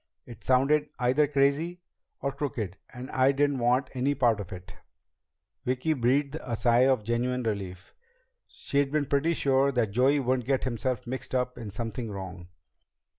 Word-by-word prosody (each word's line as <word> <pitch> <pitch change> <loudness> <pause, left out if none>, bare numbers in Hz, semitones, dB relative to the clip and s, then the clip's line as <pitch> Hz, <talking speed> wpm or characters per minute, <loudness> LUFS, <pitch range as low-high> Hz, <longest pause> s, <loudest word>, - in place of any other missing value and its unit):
It 120 -4 -12
sounded 140 +4 +3
either 130 +4 +3
crazy 145 +5 +1 0.4
or 140 - -1
crooked, 130 -9 -4 0.2
and 125 +1 -8
I 130 +1 +4
didn't 140 -1 +1
want 125 +3 +2
any 135 +2 0
part 120 -5 +2
of 95 -3 -7
it." 90 -1 -9 0.9
Vicki 130 +5 0
breathed 140 +3 +1
a 130 - -10
deep - - -7
sigh 120 +3 +4
of 130 -5 +2
genuine 125 +3 -1
relief. 95 -5 -4 0.5
She'd 140 -1 -1
been 150 -1 +1
pretty 145 +4 +1
sure 135 -1 +2
that 115 -5 +1
Joey 130 +6 +3
wouldn't 130 -2 0
get 135 -1 +1
himself 125 -1 -2
mixed 130 +1 -5
up 125 0 0
in 110 - -7
something 115 +3 -4
wrong. 95 -3 -7
130 Hz, 165 wpm, -28 LUFS, 115-140 Hz, 0.9 s, I